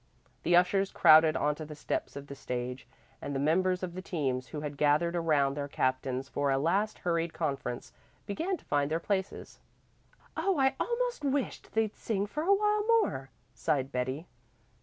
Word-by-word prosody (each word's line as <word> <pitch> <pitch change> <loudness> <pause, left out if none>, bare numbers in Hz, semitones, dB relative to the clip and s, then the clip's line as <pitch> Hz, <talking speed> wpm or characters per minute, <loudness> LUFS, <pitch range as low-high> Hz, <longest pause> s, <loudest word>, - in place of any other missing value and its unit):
The 175 - +3
ushers 195 +2 +3
crowded 155 0 +6
onto 150 +1 0
the 150 0 -8
steps 145 - -3
of 140 0 -7
the 140 - -8
stage, 125 -1 -5 0.3
and 145 - -4
the - - 0
members 185 +5 +2
of 175 -2 -3
the 185 - -5
teams, 135 -9 -2
who 150 - -6
had 150 -1 -5
gathered 150 +4 +2
around 150 -5 +2
their 145 -1 -3
captains 130 -1 -1
for 145 0 -1
a 135 - +3
last 195 +9 +1
hurried 170 -1 -1
conference, 140 -6 -3 0.3
began 330 - -2
to - - -23
find 145 -1 +1
their 160 +1 0
places. 190 +2 -3 0.8
"Oh, 390 -4 +1
I 265 -1 +3
almost 485 -6 -1
wished 275 -1 -2
they'd 220 -1 0
sing 205 -3 -1
for 295 +9 -4
a 355 +5 +2
while 420 +1 +3 0.2
more," 135 - -4 0.2
sighed 135 +1 -1
Betty. 130 +5 -2
160 Hz, 175 wpm, -30 LUFS, 140-200 Hz, 0.8 s, crowded